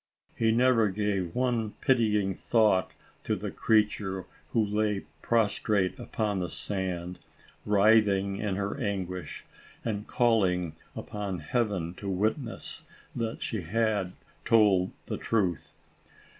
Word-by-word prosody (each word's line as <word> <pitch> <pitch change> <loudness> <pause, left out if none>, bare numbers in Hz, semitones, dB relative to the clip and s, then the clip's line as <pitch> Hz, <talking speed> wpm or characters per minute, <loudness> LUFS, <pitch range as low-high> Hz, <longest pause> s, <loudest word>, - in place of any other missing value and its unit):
He 115 -1 +2
never 115 -2 +4
gave 95 -3 -1
one 120 -4 0
pitying 105 -6 +2
thought 105 -2 +2 0.3
to - - 0
the - - -5
creature, 105 -4 +1 0.2
who 115 -2 +2
lay 105 -1 0 0.2
prostrate 105 -2 +1
upon 110 -4 -2
the 90 -2 -2
sand, 90 -1 -3 0.5
writhing 100 -2 +4
in 100 -2 -1
her 100 +1 -2
anguish, 90 -5 -4 0.4
and 105 -2 -2
calling 95 -9 +2 0.2
upon 100 -3 -4
Heaven 95 -2 -1
to 100 - -5
witness, 110 +6 -2 0.3
that 115 -1 -3
she 110 -4 -2
had 100 0 0 0.3
told 100 -5 +4 0.2
the - - -4
truth. 95 -8 -1
105 Hz, 115 wpm, -28 LUFS, 95-110 Hz, 0.5 s, never